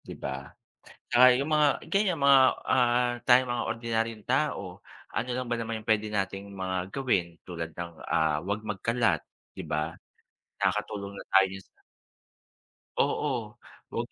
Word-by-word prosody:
'di - - -9
ba? 70 0 -5 0.4
'At - - -22
saka 125 +1 +7
yung 140 +3 -2
mga 150 -1 +4 0.2
ganyan, 195 -4 +2
mga, 140 -1 +7 0.3
ah, 120 -1 +3
tayong 125 0 +6
mga 120 - -1
ordinaryong 115 -2 -2
tao, 135 -1 +1 0.5
ano 120 - -2
lang 125 -1 -3
ba 120 - +1
naman 115 -1 -3
yung 110 - -25
pwede 110 -1 +2
nating 100 -1 -2
mga 95 -1 -3 0.2
gawin 125 -10 +1 0.2
tulad 85 -2 -6
ng, 85 0 -5 0.2
ah, 80 -2 +2
huwag 100 +3 -2
magkalat, 105 -3 0 0.3
'di - - -6
ba? 75 +2 -2 0.7
Nakakatulong 100 0 -2
na - - -9
tayo 95 0 +6
sa - - -29 1.3
Oo, 120 -7 0 0.4
'wag - - -3
110 Hz, 150 wpm, -28 LUFS, 95-125 Hz, 1.3 s, saka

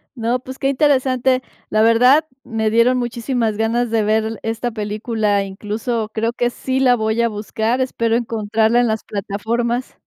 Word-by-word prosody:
No, 235 +1 0
pues, 260 +1 -10
qué 270 - 0
interesante. 260 -2 +2 0.3
La 215 0 +3
verdad, 250 +7 +5 0.2
me 220 -2 -1
dieron 240 +3 +3
muchísimas 235 -2 -1
ganas 230 +2 0
de 225 -1 +1
ver 215 +1 +2
l 220 0 -5
esta 225 +2 -2
película, 210 -1 -1
incluso 215 +3 -3
creo 230 +1 -1
que 240 -1 0
sí 260 +2 -2
la 250 -2 +4
voy 220 0 -1
a 235 - +2
buscar, 220 +3 -2
espero 230 -3 0
encontrarla 225 0 +1
en 245 - +3
las 220 0 -1
plataformas. 230 +5 -3
230 Hz, 165 wpm, -19 LUFS, 220-245 Hz, 0.3 s, verdad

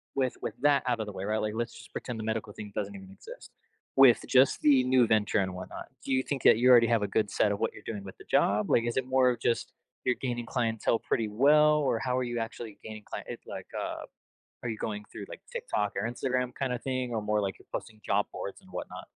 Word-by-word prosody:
with 130 -2 +1
with - - -3
that 145 -1 +4
out 120 -2 +1
of 110 - -2
the 105 - -6
way, 95 0 -5
right, 105 +2 0
like, 105 0 -2
let's 115 0 -2
just 115 -1 -13
pretend 120 -3 -5
the - - -4
medical 110 -1 -2
thing 105 -1 -8
doesn't 100 -1 -3
even 95 -1 -10
exist. - - -12 0.4
With 135 -3 +7
just 130 +1 +4
the 135 -4 +5
new 125 -2 +4
venture 105 -1 +2
and 95 -2 -1
whatnot, 90 0 -7 0.2
do 135 - -3
you 130 0 +2
think 140 -2 -3
that - - +7
you 125 +2 +4
already 120 -2 +8
have 115 -3 +2
a - - 0
good 105 0 0
set 105 - +2
of 100 - -2
what - - 0
you're - - -12
doing 105 -3 -5
with 95 - -10
the - - -14
job, 105 0 +2
like, 115 - +4
is 120 +1 -2
it 130 - +1
more 130 -1 +4
of 120 -2 -1
just, 115 0 0 0.3
you're 125 - +3
gaining 120 -2 -2
clientele 115 -2 0
pretty 110 -2 -1
well, 150 +7 +5
or 130 -6 +1
how 125 -1 -1
are 130 - +1
you 120 -1 -2
actually 115 -2 -6
gaining 110 -1 -8
client - - -7
it's - - -7
like, - - -7
uh - - -4 0.6
are 120 - -2
you 110 - -5
going 105 -1 -4
through - - -7
like, - - -9
TikTok 105 -1 -1
or 105 +4 -1
Instagram, 125 0 -1
kind 135 -2 -1
of 125 - -4
thing, 130 -2 -2
or 110 - 0
more 105 0 0
like, 95 -1 -2
you're - - -20
posting 110 -1 -6
job - - +2
boards - - -6
and - - -18
whatnot? - - -6
115 Hz, 260 wpm, -29 LUFS, 105-125 Hz, 0.6 s, already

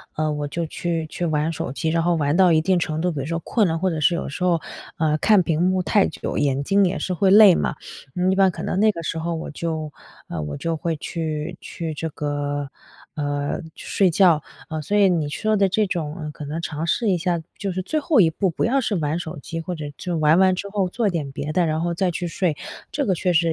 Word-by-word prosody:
呃， 155 0 0
我 150 -1 -2
就 170 +4 -3
去 165 0 -2
去 175 - -4
玩 155 0 0
手 160 - -4
机， 160 +4 -2
然 165 +1 +1
后 175 +1 +2
玩 145 0 +1
到 185 -2 +6
一 160 -1 +4
定 185 +3 +2
程 160 -2 -1
度 180 +1 +1
比 150 - -4
如 135 - -3
说 165 +2 -2
困 210 +5 +1
了， 160 - 0
或 190 +2 +1
者 160 -3 -2
是 155 +4 +3
有 170 - -3
时 140 - -5
候， 175 -3 +2 0.4
呃， 155 -1 +2
看 205 +4 +5
屏 165 -3 0
幕 185 0 +2
太 200 +2 +3
久， - - -5
眼 140 -1 +1
睛 195 +6 +3
也 180 - -1
是 - - -3
会 190 +3 +3
累 205 -3 +9
嘛， - - -1 0.6
一 - - +2
般 190 -1 +4
可 - - -7
能 185 - -1
那 215 +1 +5
个 170 - -6
时 165 0 -3
候 165 +1 -2
我 160 - -5
就 160 -1 -4 0.4
呃， 85 - -5
我 75 -1 -5
就 165 - -2
会 165 0 -2
去 160 +1 -4
去 165 -2 -5
这 165 - -3
个， 145 -1 -3 0.5
呃， 145 -1 -2 0.2
睡 190 -3 +1
觉。 165 -3 +4 0.3
呃， 160 -1 -3
所 205 - -1
以 200 -2 +5
你 165 -4 +1
说 215 +9 0
的 195 -1 +4
这 210 +2 +1
种 160 -3 -4
可 150 - -8
能 155 +3 -4
尝 160 -1 -3
试 220 +6 +1
一 185 - +3
下 175 -1 -1 0.2
就 200 -2 -3
是 185 +1 -2
最 310 +12 -1
后 290 -5 +4
一 165 - +5
步， 185 +4 0
不 - - -2
要 265 +4 +2
是 225 -5 -1
玩 155 0 -1
手 170 -1 -6
机， 165 - -6
或 165 +2 -4
者 155 -3 -6
之 180 - -4
玩 155 0 +4
完 190 0 +5
之 200 +2 -4
后 200 -2 0
做 220 +3 0
点 155 -6 -3
别 145 +2 -4
的， 175 +2 +2
然 155 0 0
后 170 0 -1
再 180 +1 +1
去 175 +1 -3
睡， 170 -1 0 0.4
这 285 - -1
个 190 - +1
确 180 +2 0
实 160 - +5
170 Hz, 275 characters per minute, -22 LUFS, 155-185 Hz, 0.6 s, 累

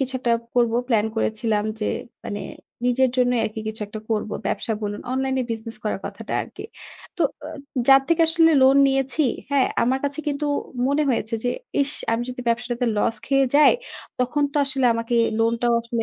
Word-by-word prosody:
কিছু 265 -1 -2
একটা 235 -2 +1 0.2
করব, 235 -2 +3 0.2
প্লান 220 -3 +2
করেছিলাম 220 -1 0 0.2
যে, 210 - -1 0.4
মানে 205 - -4 0.5
নিজের 260 +1 +3
জন্যই 245 -2 +2
আরকি 220 0 -4
কিছু 220 0 -6
একটা 215 +1 -8
করব। 215 -1 -1 0.2
ব্যবসা 225 - -1
বলুন, 205 0 -3
অনলাইন 265 0 0 0.2
বিজনেস 225 0 -5
করার 210 - -2
কথাটা 205 +2 -7
আরকি। - - -10 0.5
তো - - +1 0.2
আ - - -6 0.4
যার 270 0 +8
থেকে 335 0 +3
আসলে 325 0 +4
লোন 265 +1 +6
নিয়েছি, 270 +2 +1 0.3
হ্যাঁ? 280 -2 +3 0.2
আমার 260 +3 +2
কাছে 285 +2 -2
কিন্তু 285 +1 -2 0.4
মনে 285 +3 +2
হয়েছে 230 -1 -1
যে 245 - +2 0.3
ইস! 280 +1 -1 0.2
আমি 230 - 0
যদি 250 0 -6
ব্যবসাটাতে 240 +1 -1
লস 215 +2 +1
খেয়ে 275 0 +3
যাই, 295 0 +7 0.5
তখন 255 +4 0
তো 300 - -4
আসলে 270 -1 -1
আমাকে 230 +1 -2 0.2
লোনটাও 230 +1 +2
আসলে 235 0 -2
245 Hz, 175 wpm, -23 LUFS, 225-270 Hz, 0.5 s, যার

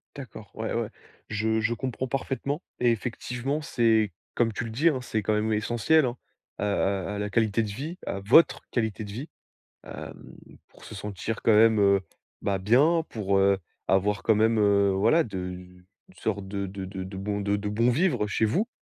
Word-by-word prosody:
D'accord, 115 -7 -10
ouais, - - -3
ouais. - - -1 0.4
Je 110 +1 0
je 110 +2 +1
comprends 130 +2 -3
parfaitement 135 +3 -2 0.2
et 120 -1 +4
effectivement, 125 +5 -3
c'est 115 -7 +2 0.2
comme 115 -2 +1
tu 105 - -3
le 115 - -5
dis, 145 +9 +3
hein, 140 -5 -1
c'est 110 -3 -2
quand 110 +2 0
même 110 +1 +1
essentiel, 120 +8 +2
hein, 125 0 -3 0.4
à - - -3
à 100 -1 0
à - - -4
la 105 0 -2
qualité 110 +1 +2
de 110 - -3
vie, 145 - -6
à 100 - -2
votre 120 +12 +5
qualité 110 -2 -1
de 100 - -8
vie, 130 +9 -6 0.6
hem, - - -8 0.5
pour - - -19
se - - -9
sentir, 105 +2 -4
quand 115 - +5
même, 110 0 +5
heu, 100 -1 +4 0.4
bah, 100 -1 0
bien, 135 - +3
pour, 100 -3 0
heu, 100 0 +3 0.3
avoir 100 +2 +1
quand 110 - +4
même, 110 +2 +3
heu, 100 -1 +4
voilà, 110 +13 +3
de 100 -7 -6
une 90 0 -7 0.3
sorte 100 -3 -3
de 100 0 -3
de 95 0 -6
de 95 0 -6
de 95 +1 -8
bon 100 +1 -2
de 100 0 +1
de 105 0 -3
bon 115 +4 +2
vivre 125 - +1
chez 110 +2 +1
vous, 180 - +1
110 Hz, 200 wpm, -27 LUFS, 100-120 Hz, 0.6 s, votre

